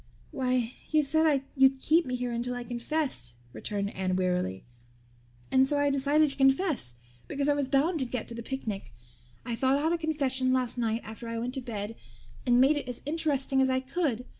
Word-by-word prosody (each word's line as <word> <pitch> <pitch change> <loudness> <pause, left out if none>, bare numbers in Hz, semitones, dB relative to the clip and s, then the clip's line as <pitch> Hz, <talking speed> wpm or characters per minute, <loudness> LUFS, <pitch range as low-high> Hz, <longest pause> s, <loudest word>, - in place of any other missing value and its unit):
"Why, 250 -2 0 0.2
you 310 -1 +3
said 300 -1 +2
you'd 265 0 +5
keep 315 +4 +2
me 250 - -1
here 245 -1 -2
until 240 +1 -2
I 245 - -4
confessed," 240 - -2 0.2
returned 200 -1 -3
Anne 185 -1 -1
wearily, 180 - -1 0.9
"and 265 0 +5
so 290 - +1
I 285 0 +2
decided 285 +2 +3
to - - -8
confess 270 - +2 0.3
because 280 0 -1
I 290 - +4
was 285 -2 0
bound 305 +6 +2
to 260 - +1
get 240 -2 -4
to - - -6
the 235 - -6
picnic. 215 - -5 0.5
I 235 - -2
thought 265 +3 +2
out 315 +4 +1
a 340 - 0
confession 270 -5 +1
last 250 -2 +1
night 225 0 0
after 220 +2 -8
I 230 0 -3
went 240 +2 -3
to 265 - -3
bed 225 -3 -5 0.5
and 245 0 +5
made 275 +4 +5
it 280 - -4
as 245 - -5
interesting 285 -3 +1
as 265 - +3
I 260 0 +2
could. 260 -3 -2
260 Hz, 200 wpm, -29 LUFS, 235-285 Hz, 0.9 s, you'd